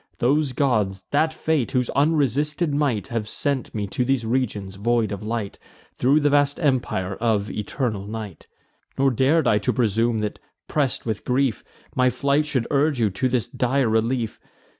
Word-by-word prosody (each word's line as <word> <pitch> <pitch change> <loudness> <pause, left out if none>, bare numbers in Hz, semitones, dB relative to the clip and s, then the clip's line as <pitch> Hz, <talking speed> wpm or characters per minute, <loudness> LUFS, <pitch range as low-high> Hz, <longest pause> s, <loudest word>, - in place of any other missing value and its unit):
Those 140 +3 +2
gods, 105 -9 0
that 155 +2 +2
fate, 155 -5 -1
whose 125 -2 +1
unresisted 150 +1 +1
might 140 -6 0
Have 115 -3 -3
sent 140 -2 -2
me 105 -1 -1
to 125 - -1
these 125 -2 0
regions 110 -5 -1
void 115 0 +1
of 100 - -4
light, 110 -2 -4 0.3
Thro' 135 +4 +3
the 145 -1 +2
vast 145 0 +2
empire 125 - 0
of 110 -3 0
eternal 105 -2 -3
night. 105 -5 -7 0.5
Nor 135 0 +3
dar'd 140 +6 +2
I 105 - +4
to 125 - 0
presume, 115 0 +1
that, 105 - -3 0.3
press'd 140 -4 -1
with 110 -3 -3
grief, 130 -2 0 0.3
My 125 0 +4
flight 140 +4 +1
should 130 -6 0
urge 145 -1 +2
you 110 -3 +2
to 130 +7 0
this 125 -2 0
dire 130 +1 +1
relief. 115 +1 0
125 Hz, 165 wpm, -23 LUFS, 110-140 Hz, 0.5 s, I